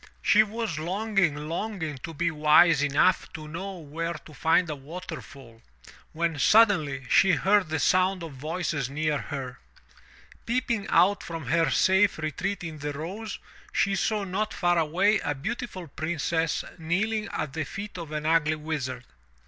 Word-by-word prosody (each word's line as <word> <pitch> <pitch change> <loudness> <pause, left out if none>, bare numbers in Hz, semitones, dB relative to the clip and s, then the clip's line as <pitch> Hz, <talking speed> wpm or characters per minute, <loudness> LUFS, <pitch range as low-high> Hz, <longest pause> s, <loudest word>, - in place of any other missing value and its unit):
She 215 - +6
was 215 -6 -2
longing, 190 -1 0
longing 165 -4 -4
to 165 - -7
be 170 +2 -1
wise 155 0 +5
enough 145 +6 +2
to 155 -3 -8
know 190 +5 -6
where 165 +2 -4
to 155 0 -12
find 165 +4 +2
a 150 - -3
waterfall, 140 -6 -10 0.5
when 165 -2 -1
suddenly 155 - +4
she 190 +9 +5
heard 190 +4 +3
the 160 - 0
sound 185 +3 +2
of 160 -3 -7
voices 155 -1 -3
near 150 +1 -1
her. 135 -4 -6 0.9
Peeping 235 -3 -1
out 185 +4 +4
from 165 -4 -6
her 165 0 +3
safe 190 +7 +3
retreat 180 +5 -3
in 160 -3 -6
the 145 0 -4
rose, 195 +9 -6 0.3
she 200 - +1
saw 210 +1 0
not 200 +3 -2
far 175 -1 +2
away 190 +7 +2
a 145 -3 -2
beautiful 190 - -5
Princess 160 +1 -1 0.2
kneeling 210 +7 -1
at 150 -3 -3
the 160 0 -2
feet 200 +6 -7
of 165 -3 -7
an 150 0 -3
ugly 155 -1 +3
Wizard. 140 -5 -4
165 Hz, 155 wpm, -27 LUFS, 150-195 Hz, 0.9 s, She